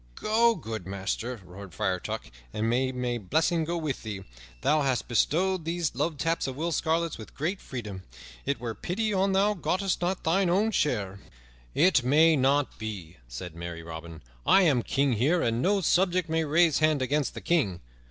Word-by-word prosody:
"Go, 230 +2 +3
good 110 - -6
master," 100 +5 -3
roared 90 0 -11
Friar 95 -4 0
Tuck, - - -6 0.2
"and 110 +1 -1
may 130 +3 +1
my 125 -2 -2
blessing 160 - +1
go 170 +2 -2
with 155 -5 -3
thee. 105 -4 -6 0.4
Thou 150 +1 +3
hast 130 -3 0
bestowed 175 +9 +1
these 165 -1 -1
love 150 +5 -1
taps 165 +1 0
of 130 - -4
Will 165 +4 -2
Scarlet's 165 0 0
with 110 - -11
great 175 +7 -2
freedom. 105 -7 -6 0.4
It 140 0 -1
were 120 -2 -4
pity 210 - -2
an 195 0 +2
thou 200 +2 +3
gottest 190 0 -1
not 180 +2 -1
thine 180 +3 +2
own 205 +5 +2
share." 105 - 0 0.6
"It 180 -7 +5
may 155 +5 +5
not 140 0 +1
be," 100 -7 -6
said 70 +9 -7
merry 85 -1 -6
Robin. 80 -1 -9 0.2
"I 195 - +5
am 140 -8 +3
king 135 +2 +1
here, 145 +10 +2
and 115 +1 0
no 195 +4 +2
subject 180 0 +2
may 160 0 0
raise 160 0 +3
hand 155 -3 +2
against 145 +2 0
the - - -4
king. 125 - +1
145 Hz, 180 wpm, -28 LUFS, 110-170 Hz, 0.6 s, It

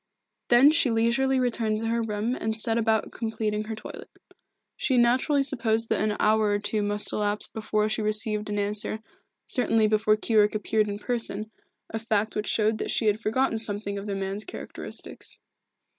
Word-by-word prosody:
Then 245 +5 +6
she 315 -4 +3
leisurely 235 +4 +2
returned 225 -3 0
to 225 - -2
her 235 0 0
room 220 +2 -2
and 220 -3 -1
set 225 0 +3
about 220 -2 +1
completing 215 -2 -3
her 220 0 -5
toilet. 215 - -10 0.7
She 260 -3 0
naturally 255 +4 +3
supposed 230 -4 -1
that 220 - +1
an 210 -1 0
hour 215 0 +3
or 205 - +2
two 205 +1 -2
must 205 0 +2
elapse 210 0 +4
before 215 -1 -1
she 215 +1 -1
received 215 0 +1
an 205 - -2
answer, 210 +2 -2 0.4
certainly 225 -4 +2
before 215 0 +2
Keyork 215 -1 +2
appeared 215 0 0
in 205 0 -4
person, 215 -2 -3 0.4
a 225 - -3
fact 220 -1 -1
which 210 - -2
showed 215 0 +1
that - - -3
she 230 - 0
had 210 0 +2
forgotten 225 +1 0
something 205 -2 -4
of 200 - -8
the 200 - -2
man's 195 +2 -4
characteristics. 365 - -8
220 Hz, 175 wpm, -26 LUFS, 210-230 Hz, 0.7 s, Then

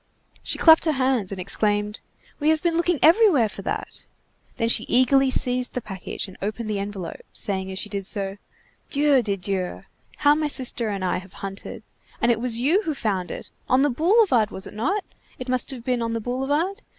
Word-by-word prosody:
She - - -3
clapped 320 0 +6
her 315 - +2
hands 255 -7 0
and 195 - -5
exclaimed:— 210 +2 0 0.4
"We 300 +1 +2
have 315 +1 +2
been 340 -1 +1
looking 340 0 +1
everywhere 330 - +6
for - - -8
that!" - - -4 0.5
Then 230 - +1
she 230 - +3
eagerly 265 +2 +3
seized 250 -1 +1
the - - 0
package 195 -3 -6
and 190 - -13
opened 215 +3 -3
the 205 - -1
envelope, 200 -3 -6
saying 190 -1 0
as 190 - -6
she 205 - -3
did 200 -2 -5
so:— 200 -1 -3 0.5
"Dieu 285 -2 +3
de 205 -3 -1
Dieu! 185 -1 -3 0.3
how 290 0 +5
my 305 0 0
sister 255 -5 -1
and 195 -2 -3
I 180 - 0
have 190 0 -14
hunted! 195 0 -5 0.4
And 235 - +3
it 230 - 0
was 235 -2 +1
you 315 - +3
who 315 -7 -3
found 195 -8 -2
it! - - -8 0.2
On 260 +2 +4
the 290 - +2
boulevard, 320 - +3
was 190 - -5
it - - -10
not? 345 - -1 0.3
It 255 - -7
must 255 0 0
have 255 -4 -5
been 250 -1 0
on 230 0 -2
the 230 - -1
boulevard? 280 - -1
240 Hz, 205 wpm, -24 LUFS, 205-290 Hz, 0.5 s, clapped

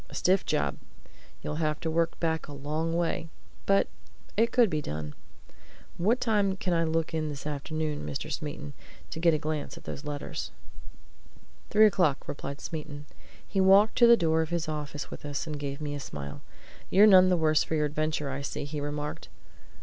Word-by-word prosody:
"A - - -10
stiff 185 +1 +2
job! 70 -1 0 0.7
You'd 150 - -3
have 155 -1 0
to 160 - -1
work 165 +1 0
back 160 -1 -1
a 145 - -8
long 155 +4 -2
way. 165 -1 -1 0.4
But 195 0 +4 0.5
it 230 +2 +3
could 245 -2 +5
be 155 -5 -1
done. 75 - -5 0.8
What 220 +8 +2
time 205 -5 +1
can 185 -2 -1
I 165 -1 +2
look 165 +1 -1
in 155 -1 -1
this 145 -1 -7
afternoon, 150 +1 -3
Mr. 150 +3 -4
Smeaton, 150 -1 -5 0.4
to - - -4
get 165 -1 +4
a - - +2
glance 155 0 -3
at - - -12
those 140 - -6
letters?" 145 -1 -4 1.2
"Three 215 +1 +6
o'clock," 175 -9 +2
replied 140 0 -5
Smeaton. 150 -2 -6 0.4
He 195 - +1
walked 195 +3 +6
to 240 - +8
the 235 0 +8
door 160 -3 +2
of 160 - -2
his 170 -2 -1
office 150 -2 -5
with - - -8
us, 145 +2 -3
and 155 -2 -4
he - - -8
gave 140 0 -4
me 145 -1 -3
a 145 - -4
smile. 70 - -7 0.5
"You're 200 +3 +7
none 185 -3 +8
the 180 - +3
worse 155 -2 +3
for 160 - -2
your 150 -1 +2
adventure, 150 -1 -1
I 135 +1 -4
see," 140 - -4
he 145 0 -4
remarked. 150 +1 -4
155 Hz, 195 wpm, -28 LUFS, 145-175 Hz, 1.2 s, to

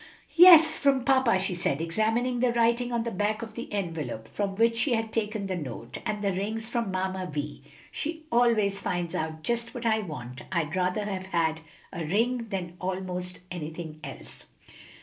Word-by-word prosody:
"Yes; 330 -3 +9
from 275 -3 +3
papa," 260 -6 +4
she 190 0 -1
said, 170 -5 -1
examining 225 +9 0
the 250 0 +3
writing 235 +1 +2
on 235 -1 0
the 235 - -3
back 210 +3 -1
of 225 -1 -8
the 235 - -7
envelope 160 - -3
from 200 - -3
which 230 +2 +3
she 245 +3 +2
had 225 -1 -1
taken 215 -2 -1
the 190 -1 -2
note, 130 -7 -6
"and 210 -1 -2
the 200 -1 +1
ring's 220 +4 -2
from 235 -3 -1
Mamma 185 0 -2
Vi. 145 -1 -4 0.3
She 320 +1 -4
always 225 -5 +3
finds 175 -2 -2
out 155 0 -3
just 235 +3 -1
what 240 -1 -5
I 220 -1 +3
want. 140 - -7
I'd 170 -2 -1
rather 185 +3 0
have 190 -2 -4
had 160 -3 0 0.3
a 170 -3 -3
ring 230 +8 0
than 180 -3 -4
almost 180 -1 -4
anything 160 -2 -6
else." - - -10
200 Hz, 180 wpm, -28 LUFS, 175-230 Hz, 0.3 s, Yes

